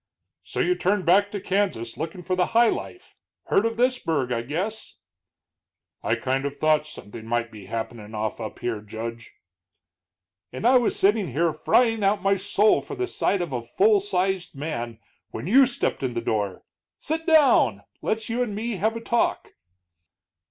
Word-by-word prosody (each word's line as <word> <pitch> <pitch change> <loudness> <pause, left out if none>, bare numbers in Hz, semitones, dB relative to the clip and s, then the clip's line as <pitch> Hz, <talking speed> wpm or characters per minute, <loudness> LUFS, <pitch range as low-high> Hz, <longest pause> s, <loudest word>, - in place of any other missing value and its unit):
"So - - -3
you 360 - +3
turned 205 - 0
back 200 +4 +4
to 205 - -4
Kansas 185 - -1
lookin' 165 +3 -5
for 185 +1 -1
high 230 +5 +4
life. 365 - -6 0.3
Heard 215 - +2
of 230 0 -5
this 250 +1 +2
burg, 140 -6 -1
I 115 -1 0
guess?" 185 - -4 1.1
"I 115 - +1
kind 130 +3 -1
of 140 0 -3
thought 155 +1 +2
something 110 -5 -10
might 115 0 -2
be 105 -3 -11
happenin' 110 -1 -5
off 110 +1 -3
up 110 - -6
here, 115 -3 -3
Judge." 115 +2 -7 1.2
"And 215 - -6
I 255 +1 +6
was 240 - 0
sitting 200 - +2
here 165 +3 +1
frying 225 +2 +2
out 200 +2 +2
my 195 0 +3
soul 205 +2 +2
for - - -8
the 375 -1 -1
sight 195 - 0
of 160 -6 -6
a 120 - -1
full 405 - +3
sized 190 - -1
man 120 -6 -4 0.3
when 110 - -6
you 255 +8 +6
stepped 240 - -2
in 130 -3 -2
the - - 0
door! 105 -5 -2 0.3
Sit 320 +2 -3
down; 260 - +4 0.2
let's 220 0 -2
you 235 +2 -1
and 220 -5 -2
me 225 0 -3
have 220 +5 0
a 230 - -5
talk." 235 +1 0
180 Hz, 175 wpm, -25 LUFS, -, 1.2 s, I